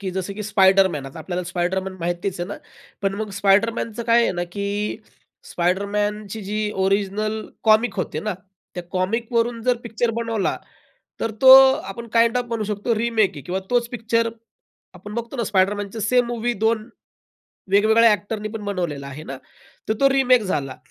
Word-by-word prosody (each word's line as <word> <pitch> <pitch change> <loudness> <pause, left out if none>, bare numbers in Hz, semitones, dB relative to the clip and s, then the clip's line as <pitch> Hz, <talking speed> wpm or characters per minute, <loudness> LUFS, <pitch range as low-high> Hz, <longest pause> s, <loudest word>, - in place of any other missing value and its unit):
की 190 -2 -3
जसं 190 +1 -4
की 210 - -5
स्पायडरमॅन 190 -7 +3
आता 135 - -10
आपल्याला 180 +2 -4
स्पायडरमॅन 185 +2 -2
माहितीच 175 +2 -3
आहे 175 - -2
ना. - - -5 0.5
पण 195 0 0
मग 215 0 -4
स्पायडरमॅनचं 215 +3 +1
काय 235 +1 +4
आहे - - +1
ना, 175 -1 -2
की 205 +1 -2 0.5
स्पायडरमॅनची 205 +4 -1
जी 210 +1 -2
ओरिजिनल 210 +2 -1 0.2
कॉमिक 220 +2 +4
होते - - -3
ना, 210 -2 -3 0.4
त्या 180 - -5
कॉमिकवरून 230 +5 -1
जर 250 +1 +2
पिक्चर 235 +1 -1
बनवला, 230 -3 -1 0.6
तर 225 - -1
तो 260 0 +10 0.4
आपण 235 -1 -9
काइंड 230 +1 +4
ऑफ 245 - -2
म्हणू 230 -2 -2
शकतो 210 +3 -1
रिमेक 220 -3 +2
आहे 145 - -8
किंवा 185 +6 -3
तोच 240 -1 +1
पिक्चर 230 -1 0 0.7
आपण 210 0 -10
बघतो 235 +3 -5
ना, 235 - -1
स्पायडरमॅनच 200 +1 0
सेम 250 0 +3
मूव्ही 240 0 -1
दोन, 220 0 +1 0.8
वेगवेगळ्या 220 +3 +5
अ‍ॅक्टरनीपण 210 +1 -4
बनवलेला 175 -9 -3
आहे 140 +3 -8
ना, 135 - -5 0.5
तर 220 - +2
तो 275 - +6
रिमेक 260 -3 +4
झाला. 145 -9 -3
210 Hz, 160 wpm, -22 LUFS, 190-230 Hz, 0.8 s, तो